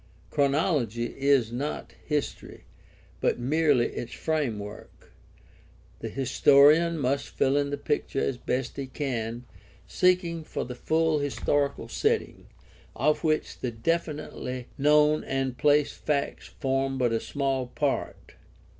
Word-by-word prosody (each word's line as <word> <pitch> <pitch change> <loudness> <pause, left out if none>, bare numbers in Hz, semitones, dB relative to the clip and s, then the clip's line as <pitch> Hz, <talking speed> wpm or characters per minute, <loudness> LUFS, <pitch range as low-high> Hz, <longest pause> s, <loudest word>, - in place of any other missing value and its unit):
Chronology 140 - +1
is 135 -4 +2
not 140 +5 -4
history, 150 -1 -3 0.6
but - - +1
merely 140 -1 +2
its 120 - -6
framework. 115 -10 -4 0.9
The - - -5
historian 145 +5 +5
must 140 -1 -1
fill 135 +1 +3
in 145 0 +1
the 145 - -2
picture 140 -1 -2
as 125 -2 -1
best 125 0 -2
he 135 -1 -4
can, 120 -4 -3 0.4
seeking 180 -3 +1
for - - -4
the 125 - -6
full 160 +4 +1
historical 145 0 -1
setting, - - -1 0.5
of 150 +7 +1
which 155 -1 0
the 125 - -2
definitely 130 -1 -3
known 150 +1 +4
and 135 -2 -2
placed 145 +1 +2
facts 140 -2 -1
form 135 -1 -1
but 125 -2 +1
a 115 - +1
small 135 -2 -2
part. 140 +2 -3
140 Hz, 120 wpm, -27 LUFS, 125-150 Hz, 0.9 s, historian